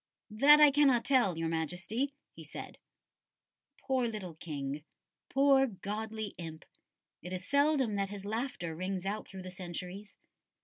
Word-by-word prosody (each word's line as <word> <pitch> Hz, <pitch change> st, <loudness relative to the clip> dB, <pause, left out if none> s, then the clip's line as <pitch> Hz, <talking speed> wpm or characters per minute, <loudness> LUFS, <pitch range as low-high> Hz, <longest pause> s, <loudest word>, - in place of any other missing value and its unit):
"That 285 Hz, +8 st, +7 dB
I 300 Hz, -1 st, +8 dB
cannot 275 Hz, -4 st, +4 dB
tell 240 Hz, -11 st, +3 dB
Your 165 Hz, 0 st, -1 dB
Majesty," 180 Hz, -, -2 dB, 0.3 s
said -, -, -9 dB
he. 280 Hz, -, -39 dB
Poor 260 Hz, -2 st, +1 dB
little 210 Hz, -6 st, -5 dB
King! 145 Hz, -2 st, -5 dB, 0.5 s
poor 270 Hz, 0 st, +5 dB
"godly 215 Hz, +1 st, -5 dB
imp"! 160 Hz, -2 st, -7 dB, 0.6 s
It 180 Hz, -, -8 dB
is 185 Hz, 0 st, -4 dB
seldom 280 Hz, -5 st, +3 dB
that 200 Hz, -1 st, -1 dB
his 200 Hz, -1 st, -7 dB
laughter 215 Hz, -7 st, -3 dB
rings 185 Hz, +2 st, -3 dB
out 205 Hz, +2 st, -3 dB
through 190 Hz, -2 st, -9 dB
the 185 Hz, -, -7 dB
centuries. 180 Hz, +2 st, -7 dB
205 Hz, 140 wpm, -32 LUFS, 180-260 Hz, 0.6 s, I